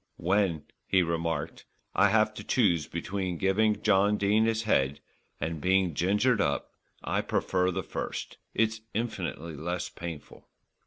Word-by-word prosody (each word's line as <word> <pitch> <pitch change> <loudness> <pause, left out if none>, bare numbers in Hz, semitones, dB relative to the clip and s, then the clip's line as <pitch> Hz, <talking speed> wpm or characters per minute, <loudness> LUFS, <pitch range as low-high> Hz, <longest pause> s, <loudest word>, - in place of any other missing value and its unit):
"When," 90 -3 +1 0.2
he 95 -1 +4
remarked, 80 -1 -3 0.3
"I - - +5
have - - +3
to - - -8
choose 80 -5 +2
between 95 0 -3
giving 105 +3 +2
John 105 0 +4
Dene 105 +2 +3
his 115 0 0
head 70 -10 +1 0.4
and 80 -1 -3
being 95 -1 +2
gingered 105 - +2
up, 70 -4 -1 0.3
I - - 0
prefer 90 -1 0
the 90 - -2
first. - - -5 0.2
It's 110 0 +1
infinitely 90 -8 -3
less 85 +4 -3
painful." 85 -4 -9
95 Hz, 140 wpm, -29 LUFS, 85-105 Hz, 0.4 s, I